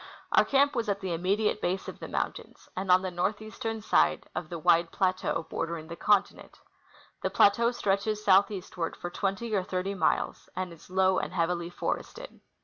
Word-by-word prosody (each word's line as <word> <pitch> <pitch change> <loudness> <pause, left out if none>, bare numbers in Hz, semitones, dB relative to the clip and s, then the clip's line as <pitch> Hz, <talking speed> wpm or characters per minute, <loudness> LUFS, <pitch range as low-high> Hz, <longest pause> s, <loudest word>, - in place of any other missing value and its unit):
Our - - +5
camp 280 +1 +3
was 230 -3 -1
at 200 0 0
the 190 -3 -3
immediate 200 +5 0
base 185 +2 -1
of - - -8
the - - -7
mountains, - - -4
and 185 0 -1
on 185 +1 +6
the 185 - -3
north 180 +4 -1
eastern 220 +1 -5
side 75 - +2
of 165 - -5
the 175 - -4
wide 165 +1 +3
plateau 185 -3 0
l^ordering 165 -1 -4
the 170 - -6
continent. 205 +2 0 0.6
The - - 0
plateau 235 +4 +4
stretches 210 -1 -1
southeastward 190 -3 +2
for 175 - -6
twenty 200 +5 -2
or 200 - +2
thirty 185 +1 -3
miles, 180 -5 -1
and 185 -1 -3
is 165 - -16
low 190 0 +3
and - - -4
heavily 170 0 -1
forested. - - -5
190 Hz, 180 wpm, -28 LUFS, 175-210 Hz, 0.6 s, on